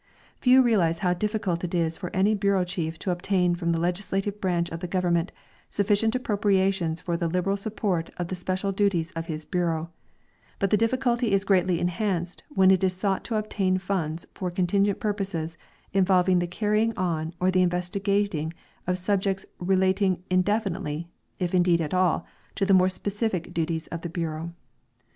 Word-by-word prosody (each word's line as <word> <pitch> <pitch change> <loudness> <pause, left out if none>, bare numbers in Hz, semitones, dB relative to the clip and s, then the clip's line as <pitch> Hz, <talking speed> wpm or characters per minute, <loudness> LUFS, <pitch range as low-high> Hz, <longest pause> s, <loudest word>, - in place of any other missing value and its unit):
Few 255 0 +6
realize 185 -9 +2
how 180 - +3
difficult 190 -3 -1
it 180 0 -2
is 165 -1 +1
for 180 +1 -5
an}^ 200 +4 +2
l)ureau 195 -2 +2
chief 170 -3 -3
to 185 - -2
obtain 180 0 +1
from 170 -1 -1
the 165 - +1
legislative 195 +3 -1
branch 175 -2 0
of 165 - -4
the 180 - -4
government 175 -1 0 0.4
sufficient 210 +3 +1
appropriations 195 - +1
for 170 0 -2
the 170 0 -1
liberal 180 +3 0
support 200 -4 -2
of 175 - -2
the - - -3
special 185 +2 -2
duties 190 -4 +1
of 165 0 -5
his 155 -1 -4
bureau, 170 -2 -1 0.7
but 195 - 0
the - - +6
difficulty 235 0 +1
is 195 0 +3
greatly 185 -3 +3
enhanced 175 -1 -1
when' 190 -9 +5
it 190 0 +3
is 185 -1 +2
sought 195 +1 -1
to 230 - -2
obtain 200 -3 0
funds 175 -4 -2
for 185 - -3
contingent 195 +3 +1
purposes 190 -6 -2 0.4
involving 185 -1 +4
the 175 - -1
carrying 215 +4 0
on 165 -3 -1
or 185 +1 +2
the 185 0 +3
investi 180 +2 -1
gating 195 -6 0 0.3
of 180 0 +1
subjects 195 +1 0
relating 190 0 +2
indefiniteh^, 185 -4 0 0.3
if 180 -1 -2
indeed 175 -2 +4
at 160 -1 -2
all, 180 -2 +2 0.3
to 195 - +1
the 195 - +4
more 185 0 +5
specific 200 -1 -2
duties 165 -1 -1
of 170 - -4
the 170 - -5
bureau. 165 -1 -3
185 Hz, 170 wpm, -26 LUFS, 170-200 Hz, 0.7 s, Few